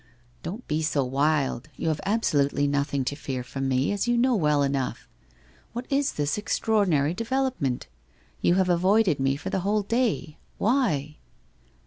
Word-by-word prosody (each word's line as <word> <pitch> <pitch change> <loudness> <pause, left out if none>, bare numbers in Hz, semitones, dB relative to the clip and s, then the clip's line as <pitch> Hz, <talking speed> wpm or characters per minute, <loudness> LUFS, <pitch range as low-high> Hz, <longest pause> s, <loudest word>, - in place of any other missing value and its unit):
' 120 0 -34
Don't 200 +10 -7
be 155 +1 0
so 150 -3 +1
wild. 140 0 0
You 160 - -1
have 155 - -1
absolutely 145 -10 +2
nothing 140 -1 0
to 145 - -2
fear 135 -3 -4
from 135 +2 -4
me, 130 +4 +1
as 205 +3 -1
you 240 0 +2
know 250 +2 +3
well 150 -6 +2
enough. 135 -2 -2 0.7
What 240 +2 -4
is 280 0 +1
this 145 +6 -1
extraor 215 -1 +1
dinary 150 0 +2
development? 230 - -1 0.6
You 175 - +3
have 190 -1 +2
avoided 185 -1 +3
me 135 0 +1
for 140 - -6
the - - 0
whole 205 +3 +1
day. 225 -8 -1 0.2
Why?' 165 - +1
155 Hz, 165 wpm, -26 LUFS, 140-215 Hz, 0.7 s, know